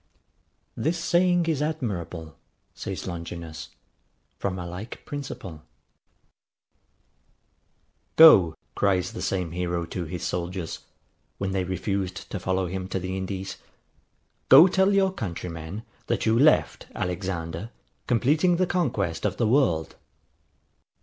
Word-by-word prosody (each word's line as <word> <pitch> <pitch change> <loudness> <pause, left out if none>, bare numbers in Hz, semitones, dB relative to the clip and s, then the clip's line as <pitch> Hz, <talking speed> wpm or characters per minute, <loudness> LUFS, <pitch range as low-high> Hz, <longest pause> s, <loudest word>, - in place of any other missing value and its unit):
This 165 +3 0
saying 175 0 +2
is 160 -4 0
admirable, 95 - -3 0.4
says 95 - -5
Longinus, 85 -2 -6 0.7
from 95 -1 -2
a 90 - -5
like 90 +6 -8
principle. 115 - -7 2.6
[Footnote: 160 0 +12
Idem.] 95 - +5
GO! 80 - -10 0.2
cries 95 -3 +1
the - - -6
same 90 -4 -1
hero 85 -1 -2
to 85 +1 -5
his 85 +1 -6
soldiers, 90 -1 -3 0.6
when 95 -1 -2
they 95 -1 0
refused 95 0 -3
to - - -3
follow 95 0 0
him 95 +1 -4
to 95 - -3
the 95 +1 -4
Indies, 95 0 -4 0.9
GO 140 +6 +10
TELL 190 +1 +3
YOUR 195 -1 +3
COUNTRYMEN, 90 - -5 0.2
THAT - - 0
YOU 110 +1 +3
LEFT 150 +3 +3
Alexander 90 +1 -3 0.4
COMPLETING 150 +9 +3
THE 185 +2 +2
CONQUEST 115 - -1
OF - - -1
THE 115 - +2
WORLD. 110 - +2
95 Hz, 125 wpm, -26 LUFS, 85-135 Hz, 2.6 s, Footnote